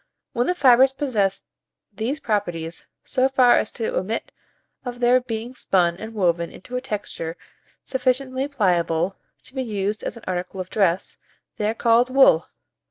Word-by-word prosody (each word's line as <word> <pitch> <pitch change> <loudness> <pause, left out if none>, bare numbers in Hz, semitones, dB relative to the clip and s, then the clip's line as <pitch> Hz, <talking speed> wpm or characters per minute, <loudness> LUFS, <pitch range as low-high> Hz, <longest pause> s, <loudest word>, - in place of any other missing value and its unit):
When 240 +1 0
the 360 - +1
fibres 265 -3 +6
possess 215 -9 0 0.5
these 235 +9 -2
properties 175 -8 -3 0.2
so 265 0 +1
far 255 -2 +5
as - - -2
to 465 +2 -3
admit - - -2 0.5
of 245 -1 -6
their 250 +1 +4
being 235 0 -5
spun 180 -8 +1
and 220 +3 -8
woven 170 -4 +1
into 250 +6 -9
a 250 - -1
texture 205 -8 -5 0.5
sufficiently 260 +1 -1
pliable 180 - +1 0.3
to - - -13
be 265 - -2
used 210 -3 -2
as - - -4
an 230 - -13
article 185 +1 -4
of 185 0 -5
dress, 190 -4 0 0.4
they 210 0 0
are 225 - -2
called 235 +2 +3
wool. 255 -11 +5
225 Hz, 160 wpm, -23 LUFS, 190-255 Hz, 0.5 s, fibres